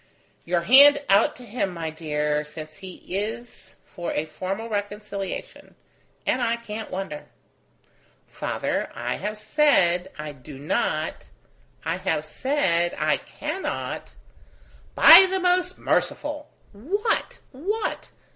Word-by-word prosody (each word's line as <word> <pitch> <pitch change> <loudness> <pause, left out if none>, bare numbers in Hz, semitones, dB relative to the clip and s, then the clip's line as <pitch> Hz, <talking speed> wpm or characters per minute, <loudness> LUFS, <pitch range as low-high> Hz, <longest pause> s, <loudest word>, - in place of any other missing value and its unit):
"Your 175 0 +1
hand 285 +8 +7
out 200 +3 +4
to 250 - -12
him, 210 -3 -2
my 165 -1 -4
dear, 150 -1 -1
since 155 +1 -10
he 190 -2 -9
is 220 +5 -5
for 175 -3 -6
a 150 - -1
formal 185 +8 -5
reconciliation; 205 -2 -5 0.5
and 255 - +1
I 235 -1 +1
can't 220 -1 -7
wonder." 185 -6 -5 1.0
"Father! - - -3
I - - -3
have 210 +2 -4
said 195 - +2
I 150 0 -6
do 140 0 -12
not... 155 +2 -2 0.6
I 165 +2 -1
have 185 -5 -1
said 175 - 0
I - - +2
cannot.. 385 - -5 0.4
." - - -29
"By 360 +4 +10
the 380 0 0
most 365 0 +1
merciful! 295 0 -1 0.2
what? 360 - -2
what? 395 +12 -3
200 Hz, 120 wpm, -24 LUFS, 170-265 Hz, 1.0 s, By